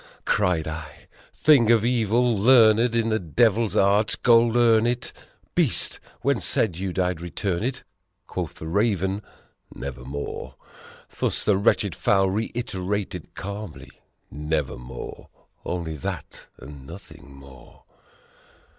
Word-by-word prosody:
Cried 90 -6 +1
I, 80 0 -8 0.2
"Thing 135 -8 +4
of 115 -2 +4
evil, 120 0 +2
learned 115 +1 +5
in 115 -1 +1
the 110 0 +1
devil's 110 +5 +1
art! 100 +2 +3
Goldurn 115 -1 +5
it! 120 0 -2 0.4
Beast! - - +1 0.2
when 140 -4 +1
said 95 -1 0
you 95 +2 -3
I'd 90 -2 0
return 85 +1 -2
it?" 125 +3 -3 0.4
Quoth - - -5
the - - -9
Raven, 95 +1 0 0.5
"Nevermore!" 70 +1 -6 0.6
Thus - - 0
the 105 - +3
wretched 100 - +2
fowl 95 -1 +2
reiterated 100 -5 -3
calmly, 100 -2 -7 0.4
"Never 75 -1 -2
more." 60 +1 -9 0.3
Only 85 -3 -4
that 65 - -6
and 70 0 -12
nothing 70 -5 -12
more. 70 -2 -16
100 Hz, 115 wpm, -24 LUFS, 80-115 Hz, 0.6 s, learned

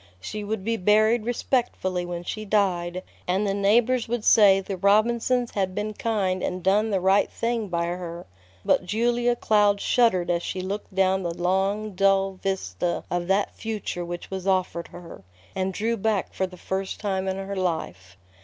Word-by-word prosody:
She 210 - -6
would 205 -1 -3
be 230 +2 0
buried 215 +3 +3
respectably 225 -7 -1
when 175 0 -5
she 215 +4 -5
died, 185 -4 0 0.2
and 190 +3 +1
the 195 - 0
neighbors 225 +5 +2
would 235 -1 -2
say 200 -3 +6
the 195 0 -5
Robinsons 235 +5 +2
had 190 -2 -2
been 210 +1 -2
kind 200 -5 -1
and 180 -1 -3
done 210 +4 +3
the 195 -3 +1
right 190 +2 +3
thing 230 -2 -2
by 170 -2 -1
her; 175 0 -5 0.4
but - - +3
Julia 240 +5 +1
Cloud 205 -3 +3
shuddered 185 -9 +2
as 170 0 0
she 185 - -4
looked 195 +1 -5
down 190 0 +2
the 170 -2 -4
long, 195 +4 0
dull 195 0 +2
vista 175 - -2
of 175 0 -1
that 195 +1 +1
future 215 -5 -4
which 175 +1 -7
was 190 0 -4
offered 185 -3 0
her, 175 -1 -11 0.3
and 190 0 -1
drew 225 +5 -1
back 210 -2 -1
for 190 - -1
the 180 0 -13
first 190 +2 -4
time 190 -2 -2
in 190 0 -1
her 195 +1 -5
life. 95 - -3
195 Hz, 175 wpm, -25 LUFS, 180-215 Hz, 0.4 s, say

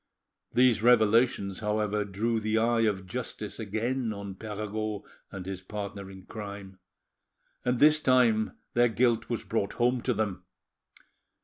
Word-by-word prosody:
These 125 -3 +4
revelations, 110 -4 +3
however, 105 0 0
drew 110 +4 -1
the 110 0 0
eye 115 0 +3
of 95 -3 -2
justice 105 +1 -5
again 115 +3 -2
on 100 -1 -6
Perregaud 105 0 -4 0.3
and 95 -2 -7
his 95 -1 -5
partner 100 0 -6
in 95 -1 -11
crime, 100 -3 -8 0.8
and 125 0 +1
this 155 +1 +6
time 125 -6 +3 0.2
their 120 0 +4
guilt 115 0 +1
was 120 - -2
brought 100 -3 -2
home 125 +1 +1
to 125 -1 0
them. 100 -3 -2
110 Hz, 135 wpm, -28 LUFS, 100-120 Hz, 0.8 s, this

